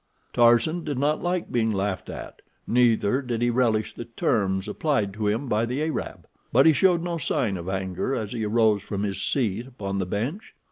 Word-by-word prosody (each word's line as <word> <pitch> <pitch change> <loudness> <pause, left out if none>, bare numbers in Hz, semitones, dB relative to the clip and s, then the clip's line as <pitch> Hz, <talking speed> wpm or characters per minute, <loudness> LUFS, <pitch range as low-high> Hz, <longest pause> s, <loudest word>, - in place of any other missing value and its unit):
Tarzan 120 +9 +4
did 145 -4 -3
not 145 +3 +1
like 180 0 -2
being 115 -2 +1
laughed 95 -2 -2
at, - - -8 0.2
neither 120 0 +3
did 120 -3 -2
he 120 - +3
relish 115 -3 +1
the 120 - -7
terms 100 -4 0
applied 105 -4 0
to 105 0 -2
him 115 +7 0
by 110 -1 +1
the 125 +6 -1
Arab, 160 0 -4 0.3
but 135 +4 +5
he 160 - +7
showed 175 +1 +3
no 170 -1 -2
sign 130 -9 0
of 90 0 -5
anger 95 +6 -2
as 110 -2 -4
he 115 -2 -3
arose 110 -1 +3
from 100 0 -4
his 100 -2 -2
seat 120 -2 0
upon 100 -6 -4
the 95 - -2
bench. 125 - -4
115 Hz, 195 wpm, -25 LUFS, 105-135 Hz, 0.3 s, he